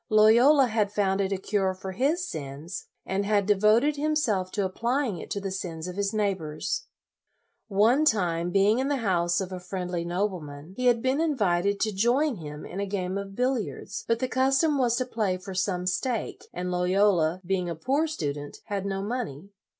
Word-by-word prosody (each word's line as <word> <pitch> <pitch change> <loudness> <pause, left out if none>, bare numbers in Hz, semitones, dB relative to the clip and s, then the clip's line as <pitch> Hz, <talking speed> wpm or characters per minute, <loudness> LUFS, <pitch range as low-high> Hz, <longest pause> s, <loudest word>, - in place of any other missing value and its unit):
Loyola 235 +7 +6
had 215 -4 0
found 200 -1 +1
it 195 0 -1
a 195 - 0
cure 190 -1 0
for 190 +1 -6
his 305 - 0
sins, 145 - -6 0.2
and 195 +1 -1
had 205 -1 +2
devoted 215 +8 +3
himself 280 -11 0
to 200 0 -1
applying 235 - -1
it - - -9
to 200 - -2
the 195 -1 -4
sins 170 -3 -5
of 180 - -6
his 200 0 0
neighbors. 200 - -2 0.8
One 225 +8 +4
time, 175 - +1
being 200 +5 +3
in 265 - 0
the 285 - +1
house 175 -8 +1
of 190 -1 -4
a 185 - -5
friendly 180 -1 -4
nobleman, 175 -4 -3
he 250 0 0
had 235 -2 +3
been 260 +2 +1
66 - - +2
LOYOLA 325 -1 +2 0.2
invited 200 +3 +1
to 215 - +2
join 240 +8 +2
him 150 -2 -8
in 185 - -6
a 200 - -1
game 190 -1 -2
of 200 0 -5
billiards, 230 -4 -2
but 230 - +2
the 255 - -1
custom 270 +4 +2
was 240 -2 +3
to 255 - 0
play 215 -7 -1
for 190 +1 -8
some 185 -1 -1
stake, 215 +6 -2
and 180 0 -4
Loyola, 180 -2 +2
being 180 -1 -1
a 170 - -3
poor 275 - 0
student, 145 - -4
had 200 -1 -3
no 195 0 -2
money. 200 - -4
200 Hz, 195 wpm, -27 LUFS, 180-240 Hz, 0.8 s, Loyola